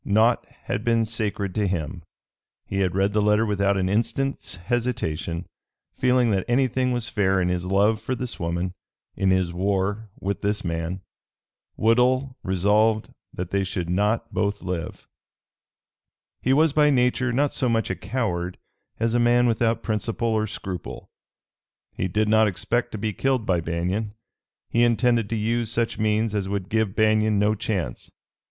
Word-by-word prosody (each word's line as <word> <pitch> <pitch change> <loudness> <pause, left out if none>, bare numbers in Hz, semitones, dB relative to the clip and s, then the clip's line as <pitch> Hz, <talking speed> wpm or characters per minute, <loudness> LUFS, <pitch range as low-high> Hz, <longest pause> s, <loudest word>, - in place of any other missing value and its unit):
Naught 110 +4 +3 0.2
had 105 - -3
been 115 -1 +2
sacred 105 -3 -2
to 105 0 0
him. 85 -1 -3 0.6
He 100 - -3
had 90 -2 0
read 100 +1 +1
the 105 - +2
letter 105 +2 +3
without 100 -1 +1
an 95 -1 0
instant's 115 +7 -1
hesitation, 85 -5 -2 0.5
feeling 125 -2 +2
that 95 -2 +1
anything 130 0 +1
was 120 -2 -2
fair 95 -2 +1
in 90 -1 +1
his 90 0 -1
love 105 +3 +2
for 130 - -2
this 125 0 -5
woman, 85 +2 -2 0.4
in 95 - +1
his 95 -2 +1
war 100 +3 -1
with 100 +1 -3
this 105 -1 -1
man. 85 +2 -3 0.8
Woodhull 125 +3 +2
resolved 105 +4 +2 0.2
that 90 +1 -6
they 100 0 +1
should 90 -2 -3
not 105 +5 0
both 100 0 -1
live. 90 -2 -5 1.3
He 130 - +1
was 150 +2 +4
by 150 -1 +4
nature 125 -1 +2
not 140 +4 +1
so 130 - 0
much 115 -1 +1
a - - -2
coward 90 -8 -2 0.4
as 115 0 +1
a 120 - +3
man 120 +1 +4
without 115 -1 +1
principle 115 +1 -1
or 110 -1 +1
scruple. 95 -3 -6 0.9
He 95 - -2
did 105 +4 0
not 110 0 +5
expect 100 +6 -1
to - - -3
be 105 0 -2
killed 130 0 0
by 90 -4 +1
Banion. 90 +6 -2 0.5
He 115 - +2
intended 120 -2 +2
to 115 - -1
use 115 +1 0
such 115 0 -1
means 110 0 +1
as 100 -2 -1
would 100 -2 -3
give 110 -2 0
Banion 110 -1 +3
no 105 +1 +3
chance. 95 - -3
105 Hz, 160 wpm, -24 LUFS, 95-115 Hz, 1.3 s, not